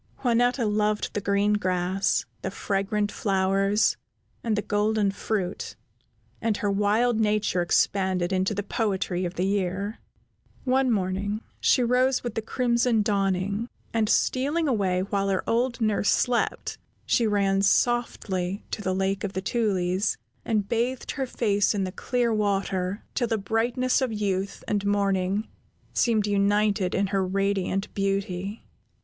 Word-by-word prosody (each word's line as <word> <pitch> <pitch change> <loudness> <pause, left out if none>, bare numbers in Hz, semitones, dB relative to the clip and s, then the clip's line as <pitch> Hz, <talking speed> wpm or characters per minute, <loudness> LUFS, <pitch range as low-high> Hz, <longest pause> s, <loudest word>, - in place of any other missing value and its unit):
Juanetta 245 0 +2
loved 210 0 0
the 205 - -2
green 200 +1 +2
grass, 185 -1 0 0.2
the - - -2
fragrant 205 +1 -1
flowers, 195 +1 +1 0.5
and 225 -2 +1
the 210 - -1
golden 210 -1 +1
fruit, 195 -2 -3 0.7
and 220 -2 0
her 205 - 0
wild 215 +4 +2
nature 210 -4 +1
expanded 185 0 +1
into 190 +3 +1
the 205 - -2
poetry 195 -4 -1
of 175 +1 -4
the 180 - 0
year. 200 +2 -1 0.6
One 260 0 +2
morning 200 0 -1 0.2
she 250 - +3
rose 250 +2 +2
with 240 -3 -3
the 225 - -2
crimson 235 -1 +1
dawning, 200 +2 0 0.2
and, 220 -2 +1
stealing 295 +5 +1
away 195 -8 +1
while 195 0 -1
her 190 -1 -1
old 240 +1 +1
nurse 215 -2 +1
slept, 245 -1 0 0.3
she 235 - +2
ran 195 -2 +2
softly 195 -4 +1
to - - -3
the 185 -2 -1
Lake 195 0 -1
of 200 -1 -3
the 190 - -2
Tulies, 195 -4 0 0.3
and 215 -3 0
bathed 240 +4 -1
her 270 -2 -3
face 205 -4 +1
in 200 - 0
the 185 - -3
clear 240 +4 0
water 195 -2 -1
till 240 - 0
the 225 -1 0
brightness 235 +6 +1
of 260 -3 0
youth 200 -2 -2
and 205 -1 0
morning 200 0 +1 0.5
seemed 220 -3 +2
united 205 -1 +2
in 200 - +2
her 195 -1 +2
radiant 195 0 -1
beauty. 195 0 -2
205 Hz, 145 wpm, -26 LUFS, 195-225 Hz, 0.7 s, she